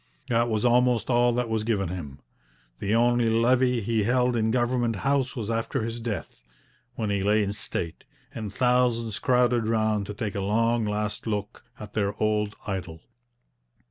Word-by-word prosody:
That 120 0 +2
was 110 +1 0
almost 125 -1 +3
all 120 0 +4
that 125 0 0
was 110 -1 -1
given 105 -5 0
him. 75 -7 -7 0.6
The 100 +3 0
only 120 0 +3
levee 125 +2 +3
he 110 +1 0
held 125 +3 +2
in 110 -1 +1
Government 120 -1 +1
House 135 +4 0
was 115 -3 -3
after 115 +2 -1
his 115 +1 -4
death, 110 - -5 0.5
when 110 -3 -2
he 100 -1 0
lay 105 +2 +3
in 100 0 -2
state, 85 -5 -4 0.3
and 110 -3 -5
thousands 120 -1 +1
crowded 125 -2 +2
round 110 -3 +1
to 105 - -6
take 105 -2 -3
a 100 - -3
long 115 +3 +1
last 105 +1 -2
look 105 -1 -4 0.2
at 105 -1 -9
their 100 -2 0
old 105 -1 0
idol. 90 -5 -5
115 Hz, 170 wpm, -26 LUFS, 105-120 Hz, 0.6 s, all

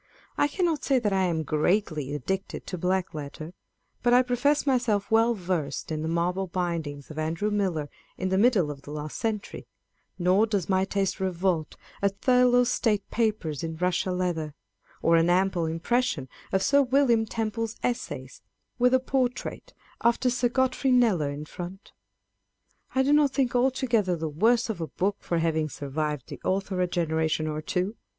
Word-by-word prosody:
I 290 - +3
cannot 330 -1 -1
say 270 - +3
that 215 -5 0
I 190 -1 +2
am 165 -3 0
greatly 155 -2 0
addicted 190 +8 -4
to 180 - -5
black 185 +1 0
letter, 155 +2 -7 0.5
but 245 0 +4
I 250 - +6
profess 255 +5 +1
myself 245 -7 +1
well 225 +1 +4
versed 170 - -3
in 155 -1 -2
the 160 - -2
marble 175 +3 0
bindings 165 -5 -3
of 155 - -6
Andrew 165 +7 -1
Millar,1 180 -8 -1 0.3
in 185 - -2
the 190 - +1
middle 205 -9 +3
of 140 -1 -9
the 145 - -12
last 150 0 -5
century; 220 -2 -3 0.5
nor 185 +5 +3
does 200 -5 -1
my 190 -1 +2
taste 195 0 -1
revolt 180 -4 -1 0.3
at 200 0 0
Thurlow's 250 -1 +4
State 210 -5 0
Papers, 210 - -1
in 160 -1 -3
russia 180 +2 0
leather; 170 -5 -2 0.5
or 165 0 +5
an 165 +1 +3
ample 180 -2 +2
impression 165 - 0 0.2
of 190 0 +1
Sir 280 0 +4
William 250 -4 +3
Temple's 225 0 -3
Essays, 130 - -3 0.4
with 250 +1 +5
a - - +4
portrait 255 -1 -2 0.3
after 235 +2 +2
Sir 245 0 +1
Godfrey 260 +1 +1
Kneller 215 - +3
in 145 +1 -6
front. 180 +5 -8 1.0
I 265 - +4
do 280 +2 +3
not 295 -2 +4
think 265 -4 +1
altogether 245 -7 +2
the 160 -1 -3
worse 225 +10 +2
of 210 -7 -4
a 160 - -2
book 200 +5 -1
for 170 - -2
having 160 -1 0
survived 145 -1 -3
the - - -8
author 190 -1 -1
a 180 - +2
genera 160 -2 0
tion 155 0 -1
or 155 0 -3
two. 185 +7 -2
190 Hz, 170 wpm, -27 LUFS, 160-235 Hz, 1.0 s, I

